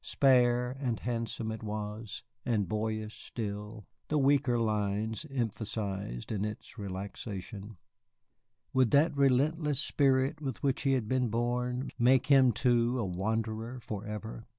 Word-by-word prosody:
Spare 125 -2 +4
and 125 -5 -1
handsome 115 -2 -2
it 110 - -6
was, 105 0 -5 0.2
and 110 -6 +1
boyish 110 +1 -2
still, 105 -1 -5 0.2
the 150 - +1
weaker 135 -3 +3
lines 110 +3 -1
emphasized 105 - -3
in 105 -2 -1
its 105 0 -6
relaxation. 100 +1 -6 1.0
Would 130 -3 +4
that 145 +4 +4
relentless 140 +2 +2
spirit 135 -2 +2
with 135 -3 -4
which 135 -2 +1
he 135 -2 +2
had 125 -5 0
been 130 +1 +1
born 125 +3 -1
make 125 +1 +5
him, 135 -3 +6
too, 120 0 +2
a 115 - 0
wanderer 110 +5 -2
forever? 105 0 -6
115 Hz, 130 wpm, -31 LUFS, 105-130 Hz, 1.0 s, him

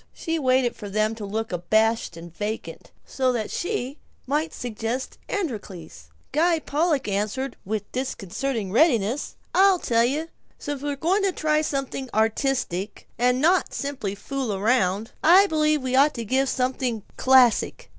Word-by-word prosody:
She 325 -1 -2
waited 255 -3 +2
for 205 - -8
them 215 +2 +1
to 220 -2 -7
look 220 +2 -3
abashed 215 +2 +1
and 170 0 -11
vacant, 215 +3 -5 0.2
so 260 -1 0
that 220 -3 -3
she 315 - -3 0.3
might 300 +4 -1
suggest 235 +2 -4
"Androcles." 195 - -5 0.2
Guy 330 +3 +3
Pollock 300 -3 0
answered 210 +7 -2
with 210 +1 -4
disconcerting 250 -3 -3
readiness, 240 - +2 0.2
"I'll 385 0 +5
tell 230 -8 +2
you: 300 +7 -1 0.3
since 290 -2 -5
we're 290 0 -2
going 345 +8 +1
to 395 -1 +2
try 305 -3 +1
to - - +3
do 310 - -2
something 270 -1 -3
artistic, 220 - -1
and 250 +1 +3
not 345 +5 +2
simply 260 -9 -3
fool 265 +2 -3
around, 205 -1 +1
I 365 +5 +7
believe 305 -5 +1
we 260 0 -1
ought 285 +3 +4
to 230 - -4
give 265 +4 +1
something 250 -4 -1
classic. 260 - +3
255 Hz, 155 wpm, -24 LUFS, 215-295 Hz, 0.3 s, I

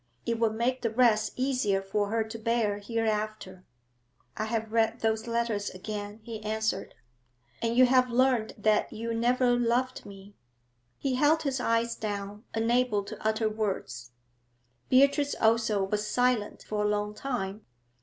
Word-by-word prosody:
It 230 -1 -1
would 225 -1 +1
make 250 +3 0
the 230 - 0
rest 220 -2 +3
easier 250 -7 +1
for 200 +1 -1
her 225 +1 +1
to 220 +1 -8
bear 220 -2 0
hereafter. 215 -3 -3 0.7
'I 215 - -2
have 220 -1 -2
read 225 -1 +1
those 220 +1 0
letters 230 -3 -1
again,' 205 +2 -6
he 225 -2 -7
answered. 220 -2 -2 0.7
'And 230 +1 0
you 255 - +8
have 255 0 +4
learnt 240 -4 +1
that 215 -1 +2
you 230 +1 -4
never 245 +2 +2
loved 245 +2 0
me?' 200 0 -12 0.6
He 270 - -1
held 295 +5 +3
his 270 -3 -1
eyes 230 -1 +1
down, 205 +1 -5
unable 225 -2 +2
to 215 +1 -9
utter 220 0 +1
words. 190 - -3 0.8
Beatrice 280 +2 +4
also 220 -3 +2
was 210 +2 -1
silent 245 -3 0
for 210 -1 -2
a - - +2
long 210 0 -1
time. 210 -4 -4
220 Hz, 150 wpm, -28 LUFS, 210-240 Hz, 0.8 s, you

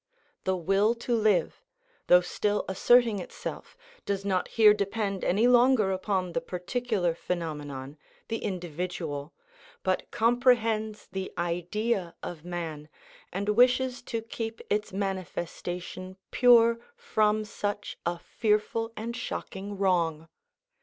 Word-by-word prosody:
The 190 -1 +1
will 195 +6 +2
to 240 +1 -3
live, 215 -4 +2 0.5
though 180 0 +7
still 205 +3 -1
asserting 230 +2 +4
itself, 180 - -7 0.3
does 195 -1 -2
not 185 -2 +1
here 215 -2 +6
depend 200 -1 -2
any 205 +6 +3
longer 245 -4 +5
upon 185 -2 -1
the 250 - 0
particular 190 -2 -1
phenomenon, 150 -5 -5 0.3
the 225 0 -2
individual, 170 -4 -4 0.5
but 185 -1 0
comprehends 225 -2 +2
the 190 0 -4
Idea 175 +3 -1
of 165 -3 -6
man, 165 -4 -5 0.4
and 200 +3 -2
wishes 250 +3 +3
to 230 -2 -2
keep 225 0 -5
its 210 +1 0
manifestation 185 -1 -4
pure 235 -1 +6 0.2
from 215 - +1
such 205 0 -4
a 170 0 -1
fearful 220 +4 0
and 230 +2 -4
shocking 200 -4 -5
wrong. 170 -5 +1
200 Hz, 115 wpm, -28 LUFS, 180-225 Hz, 0.5 s, though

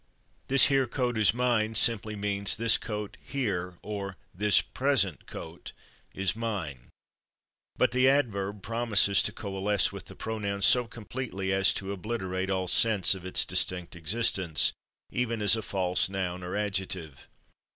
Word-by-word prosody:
"/This 135 -1 +6
here/ 135 -2 +2
coat 125 0 -2
is 110 -2 +4
mine" 115 -2 0
simply 110 -1 +3
means 100 -1 +2
"this 115 +1 +4
coat, 105 -3 -6
/here/, 95 -10 -3
or 100 -2 -5 0.2
this 105 +3 +3
/present/ 120 - 0
coat, - - -9 0.4
is 95 +1 0
mine." 95 - -5 0.9
But - - +2
the 130 +1 +4
adverb 105 -8 0
promises 110 -4 +3
to - - +1
coalesce 100 0 0
with - - -8
the - - -11
pronoun 100 -3 -4
so 115 +7 +4
completely 110 -4 -5
as 95 -2 +4
to 95 0 -4
obliterate 95 -2 -3
all 95 -1 -1
sense 100 0 +3
of 95 -1 -8
its 95 - +1
distinct 90 -2 -1
existence, 90 -1 +1 0.4
even 115 -2 -1
as 105 +1 +5
a 110 - -3
false 95 -3 0
noun 90 -2 -3
or 90 +1 -5
adjective. 95 -7 -3
100 Hz, 145 wpm, -28 LUFS, 95-115 Hz, 0.9 s, This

